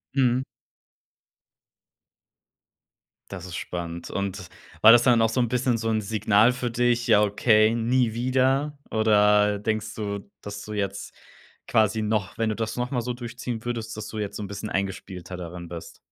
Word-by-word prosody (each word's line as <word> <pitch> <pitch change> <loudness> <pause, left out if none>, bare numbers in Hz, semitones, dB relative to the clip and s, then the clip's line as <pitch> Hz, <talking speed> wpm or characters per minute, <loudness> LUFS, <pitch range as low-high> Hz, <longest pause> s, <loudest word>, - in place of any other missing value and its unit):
Mhm. 130 -1 +2 2.9
Das - - -7
ist 85 - -7
spannend. 85 -1 -5
Und 100 -2 -4 0.3
war 110 - +10
das 120 0 +7
dann 120 -3 +4
auch 115 - +3
so 130 - -1
'n 120 - +1
bisschen 125 0 +1
so 115 0 -2
'n 110 -1 +1
Signal 110 +2 +3
für 125 -1 -3
dich: 120 +1 +1
„Ja, 105 -2 +5
okay, 110 +1 +3
nie 120 0 +1
wieder“? 130 +4 +1
Oder 105 -1 +4
denkst 110 +1 -3
du, 100 -2 -5
dass 100 0 -7
du 105 - -7
jetzt 100 -1 -3 0.6
quasi 110 0 +2
noch 105 -3 -1
wenn 115 -1 0
du 105 - -1
das 115 -1 -3
nochmal 125 0 -2
so 125 +1 -3
durchziehen 120 -1 -6
würdest, 115 -2 -4
dass 110 - -6
du 110 - -6
jetzt 105 -1 -4
so 105 - -5
'n - - -5
bisschen 100 +2 -6
eingespielter 95 -2 -4
darin 85 0 -7
bist? 85 -1 -9
110 Hz, 170 wpm, -25 LUFS, 100-120 Hz, 2.9 s, war